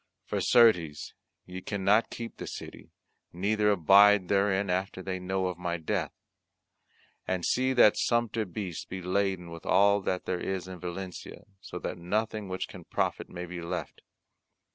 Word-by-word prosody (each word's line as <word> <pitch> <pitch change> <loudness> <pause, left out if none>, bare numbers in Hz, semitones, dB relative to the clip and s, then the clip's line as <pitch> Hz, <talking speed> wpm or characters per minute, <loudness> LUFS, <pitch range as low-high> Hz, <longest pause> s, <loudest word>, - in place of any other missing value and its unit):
For - - -2
certes 90 -11 +3 0.3
ye 90 +1 -8
cannot 100 +3 +2
keep 115 -1 -7
the - - -7
city, - - -9 0.4
neither 105 +4 +1
abide 100 +1 +6
therein 100 -1 +2
after 95 +1 -2
they 95 0 -3
know 95 +1 -1
of 90 -1 -3
my 85 -1 -2
death. 80 - -2 1.2
And 90 -2 -1
see 130 +1 +2
that 115 -4 +6
sumpter 115 -2 +1
beasts 90 -2 -5
be 95 -1 -7
laden 95 -2 -1
with 85 0 -9
all 100 0 +4
that 95 -1 -2
there 90 -1 -2
is 95 -1 -3
in 95 -1 -8
Valencia, 90 +1 -7
so 90 - -8
that 90 - -5
nothing 105 +3 -2
which 95 0 -3
can - - -11
profit - - -2
may 90 0 -6
be 90 0 -7
left. 85 -3 -5
95 Hz, 160 wpm, -29 LUFS, 90-105 Hz, 1.2 s, abide